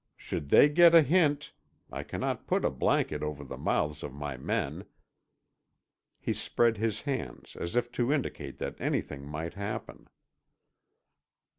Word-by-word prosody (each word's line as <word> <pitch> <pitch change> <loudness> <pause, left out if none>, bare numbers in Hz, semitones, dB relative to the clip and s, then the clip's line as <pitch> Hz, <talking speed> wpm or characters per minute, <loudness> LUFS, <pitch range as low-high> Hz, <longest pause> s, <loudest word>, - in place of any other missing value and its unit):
Should 70 - -5
they 145 - +8
get 170 +3 +6
a 165 - +9
hint—I 150 -1 -1
cannot - - -3
put - - +1
a - - +2
blanket - - +1
over 75 -1 -4
the 70 - -7
mouths 75 0 -1
of 70 -2 -7
my 70 -1 -4
men——" 65 - -2 1.3
he - - -1
spread 115 -2 +1
his 110 0 -1
hands 135 -3 -5
as 85 +6 -5
if 120 0 +1
to 120 +2 0
indicate 75 - -2
that - - -5
anything 70 0 -2
might 80 +3 -5
happen. 100 +2 -6
110 Hz, 140 wpm, -30 LUFS, -, 1.3 s, a